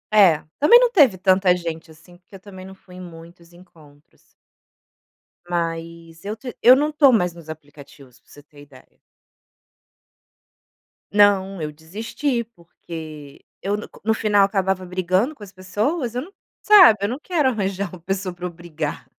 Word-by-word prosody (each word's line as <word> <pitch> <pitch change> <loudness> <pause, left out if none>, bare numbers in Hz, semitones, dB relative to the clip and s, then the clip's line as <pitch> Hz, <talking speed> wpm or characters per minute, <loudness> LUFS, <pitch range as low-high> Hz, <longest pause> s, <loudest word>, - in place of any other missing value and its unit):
É, 185 -8 +5 0.2
também 420 +12 +7
não - - +2
teve 280 - +4
tanta 185 0 +3
gente 165 -2 -7
assim, 160 +3 -18
porque 180 +2 -19
eu - - -11
também 190 -1 -12
não 190 0 -12
fui 185 -1 -18
em 185 - -10
muitos 170 0 -14
encontros. 155 -5 -21 1.3
Mas 165 -1 -5
eu 205 +2 -5
te 245 +2 -9
eu 250 +2 +8
não 295 +3 0
tô 295 -3 +4
mais 180 -7 +1
nos 170 -2 -15
aplicativos, 145 -4 -14
pra - - -33
você 145 - -16
ter 145 0 -18
ideia. 140 -3 -19 2.2
Não, 195 -3 +3
eu 150 -1 -5
desisti, 225 - -4
porque 160 -7 -12 0.2
eu 200 +1 -2
no 210 - -8
co - - -18
no 220 - +2
final 210 -2 +2
acabava 190 -2 -2
brigando 185 - -1
com 215 - -14
as 200 - -12
pessoas, 220 - -3
eu 250 - -2
não 340 +8 -11 0.3
sabe, 375 - +7
eu 200 - -1
não 255 +4 -5
quero 320 -8 0
arranjar 200 -4 -3
uma 180 - -10
pessoa 190 +1 -4
para 180 0 -8
eu - - -3
brigar. 165 -3 -7
185 Hz, 170 wpm, -21 LUFS, 165-215 Hz, 2.2 s, eu